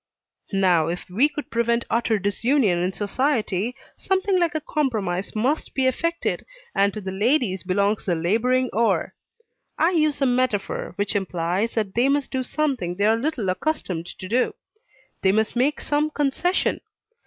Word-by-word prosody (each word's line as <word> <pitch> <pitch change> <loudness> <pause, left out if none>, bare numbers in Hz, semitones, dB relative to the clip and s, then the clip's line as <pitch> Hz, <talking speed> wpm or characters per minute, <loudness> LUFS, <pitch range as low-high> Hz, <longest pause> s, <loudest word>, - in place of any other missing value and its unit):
Now, 180 -5 +3
if 175 +1 -4
we 265 +11 +3
would 295 - -6
prevent 235 0 +1
utter 230 -1 +1
disunion 205 0 +1
in 180 +2 0
society, 220 0 -1 0.2
something 380 0 +1
like 340 -2 +1
a - - +1
compromise 220 - -2
must 260 +8 -1
be 265 - +1
effected, 335 +6 0 0.3
and 200 +1 +3
to 215 - -4
the 190 -1 -4
ladies 210 -1 +1
belongs 200 +3 0
the 175 - +2
laboring 235 +9 +1
oar. 230 +1 +1 0.6
I 330 - +3
use 310 -4 +2
a 275 - +2
metaphor 245 -5 0
which 205 0 -1
implies 185 +2 -1
that 210 -4 -1
they 245 +4 +3
must 285 0 0
do 260 - -1
something 255 - -1
they 200 +2 +1
are 220 +1 +5
little 245 -3 -2
accustomed 185 - -2
to 185 - -8
do; 245 +5 +1 0.7
they 190 - +4
must 220 +3 +1
make 270 +5 +1
some 295 +1 0
concession. 300 +5 0
230 Hz, 160 wpm, -23 LUFS, 195-280 Hz, 0.7 s, are